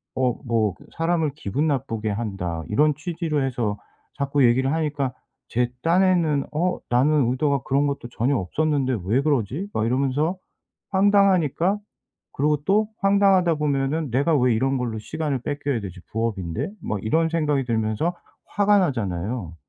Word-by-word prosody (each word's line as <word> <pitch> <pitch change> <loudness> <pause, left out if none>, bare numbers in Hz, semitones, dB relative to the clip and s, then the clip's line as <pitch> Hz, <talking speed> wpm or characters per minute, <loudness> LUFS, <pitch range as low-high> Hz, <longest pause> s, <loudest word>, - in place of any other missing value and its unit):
어 130 -2 +1
뭐 110 -4 +1 0.2
"사람을 165 -3 +1
기분 145 +3 -1
나쁘게 115 -7 -1
한다." 95 -6 -3
이런 150 +7 +3
취지로 155 -1 -2
해서 115 -5 -2 0.4
자꾸 140 0 +1
얘기를 130 +4 +3
하니까 145 -5 -1 0.4
제 120 +1 0
딴에는 170 -4 +3
'어? 175 +4 0
나는 130 +1 +3
의도가 140 +1 +1
그런 140 +2 +1
것도 140 -4 -3
전혀 125 +4 0
없었는데 135 - 0
왜 115 +8 +2
그러지?' 140 - -1
막 110 - 0
이러면서 140 +7 +1 0.6
황당하니까 195 -2 +3 0.6
그러고 150 +2 +2
또 210 +2 +3
황당하다 195 -3 +4
보면은 145 0 -1
'내가 140 +7 +2
왜 125 -2 +3
이런 135 +4 +1
걸로 120 -3 -3
시간을 150 +2 -3
뺏겨야 145 -4 -2
되지 95 -2 -8
부업인데?' 105 - -2
막 110 - -2
이런 160 +9 +2
생각이 150 -5 0
들면서 115 +8 -1 0.4
화가 205 0 +4
나잖아요. 105 - -2
140 Hz, 325 characters per minute, -23 LUFS, 120-160 Hz, 0.6 s, 황당하다